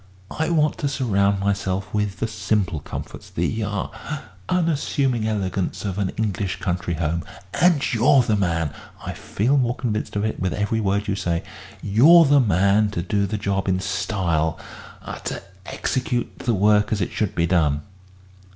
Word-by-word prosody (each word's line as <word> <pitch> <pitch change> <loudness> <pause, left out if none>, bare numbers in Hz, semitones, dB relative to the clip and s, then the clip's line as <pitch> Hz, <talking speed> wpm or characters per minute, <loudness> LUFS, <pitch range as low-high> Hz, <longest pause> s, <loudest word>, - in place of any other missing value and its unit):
I 160 +1 -1
want 155 -3 +2
to 145 - 0
surround 100 -8 +1
myself 95 -1 -1
with 105 -2 -1
the 115 - +1
simple 105 -6 -1
comforts, - - -8
the 110 +7 -1
ah 105 +8 -4 0.3
unassuming 140 -8 +1
elegance 100 -2 -2
of 100 0 -2
an 95 -2 0
English 100 -3 -1
country 90 -3 -2
home. 80 0 -1 0.3
And 175 -5 +3
you're 125 +3 +5
the 110 -2 +1
man 85 -6 0 0.3
I - - -3
feel 125 +8 0
more 120 -2 +1
convinced 110 -4 -3
of 105 +1 0
it 110 - -2
with 95 -1 -1
every 105 +2 0
word 100 +1 0
you 100 - +1
say 85 -4 -1 0.4
you're 150 - +7
the 145 0 +5
man 100 -1 +3
to 85 - 0
do 100 +2 0
the 110 +2 -2
job 100 -1 -1
in 95 0 +1
style 90 -5 -1 0.5
ah - - -6
to - - -4 0.2
execute 125 -2 -2
the 120 -3 0
work 105 +1 +3
as 110 - +1
it 90 - -1
should 105 -4 -2
be 85 - +2
done." 75 -4 +2
100 Hz, 170 wpm, -23 LUFS, 95-115 Hz, 0.5 s, you're